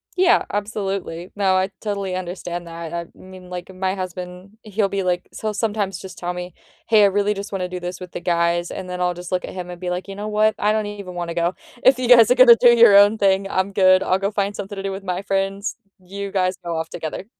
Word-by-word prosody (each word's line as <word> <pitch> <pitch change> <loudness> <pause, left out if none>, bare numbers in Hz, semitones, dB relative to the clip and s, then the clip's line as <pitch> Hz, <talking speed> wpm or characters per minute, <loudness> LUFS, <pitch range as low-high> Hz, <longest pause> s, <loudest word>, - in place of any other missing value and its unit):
Yeah, 365 -1 +4
absolutely. 195 -4 -4
No, 195 -2 +2
I 190 +1 +1
totally 200 -3 -3
understand 175 -1 -5
that. 165 0 -7
I 170 0 -3
mean, 185 -1 -13
like, 180 +1 -7
my 190 +1 -2
husband, 185 +2 -7
he'll 210 -1 -1
be 200 - -2
like 180 -1 -1
s - - -9
he'll 215 -1 -2
sometimes 205 -4 -1
just 190 -1 -10
tell 175 0 -3
me, 180 -1 -7 0.3
"Hey, 215 -2 +5
I - - +7
really 205 +1 +1
just 200 0 -7
wanna 185 -2 -2
do 180 0 -6
this 175 0 -6
with 180 -1 -9
the - - -5
guys," 170 0 0
and 190 - -6
then 180 0 -5
I'll 180 0 0
just 175 0 -9
look 185 - 0
at - - -7
him 180 -1 -6
and 175 0 -10
be 180 - -3
like, 180 +1 -3
"You 195 - -7
know 205 +1 -5
what? 215 0 +2
I 210 - +2
don't 215 0 0
even 200 -3 -7
wanna 175 -1 -4
go." 170 +2 0 0.3
If 260 -1 +6
you 255 -1 -2
guys 235 -3 +7
are 250 - +5
gonna 250 -2 +9
do 245 - +7
your 230 -4 +8
own 205 +2 +6
thing, 195 -1 +2
I'm 190 +1 0
good. 185 -1 +5
I'll 185 - +1
go 200 +1 0
find 200 0 -1
something 205 0 -6
to 195 - -6
do 195 - -2
with 195 +1 -6
my 185 0 -3
friends, 195 +1 -2 0.2
you 195 +2 -7
guys 185 -1 0
go 170 -1 -3
off 160 0 -3
together. 160 +4 -6
190 Hz, 255 wpm, -21 LUFS, 180-205 Hz, 0.3 s, gonna